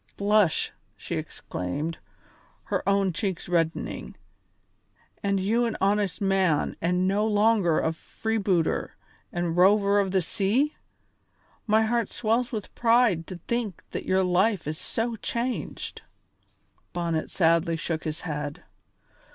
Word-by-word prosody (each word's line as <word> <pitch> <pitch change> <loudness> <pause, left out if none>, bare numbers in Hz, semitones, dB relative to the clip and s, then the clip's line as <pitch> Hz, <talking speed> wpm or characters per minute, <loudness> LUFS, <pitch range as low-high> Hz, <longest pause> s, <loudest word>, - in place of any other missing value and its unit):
"Blush!" 205 -4 +3 0.3
she - - -6
exclaimed, 145 - -4 0.6
her - - -1
own 195 -2 +2
cheeks 190 -1 -3
reddening, 165 -2 -1 1.1
"and 200 -1 +1
you 225 +6 +2
an 230 - -2
honest 200 -2 +1
man 190 -6 +2
and 180 +2 +1
no 205 +3 +2
longer 210 -5 +3
a 160 - 0
freebooter 195 -2 -1 0.4
and 175 -1 -1
rover 200 +2 +5
of 195 -1 +1
the 185 -1 +1
sea? 230 - +1 0.9
My 220 +1 +4
heart 235 +1 0
swells 235 +2 0
with 215 -5 -5
pride 230 -8 +3
to 185 - -6
think 235 -7 -2
that - - -4
your 190 0 +3
life 185 +2 +2
is 155 +1 -3
so 230 0 -2
changed." 240 +3 -3 0.9
Bonnet 170 -2 -1
sadly 165 -1 +2
shook 165 -1 -3
his 155 -1 -4
head. 150 -3 -4
195 Hz, 125 wpm, -26 LUFS, 170-220 Hz, 1.1 s, rover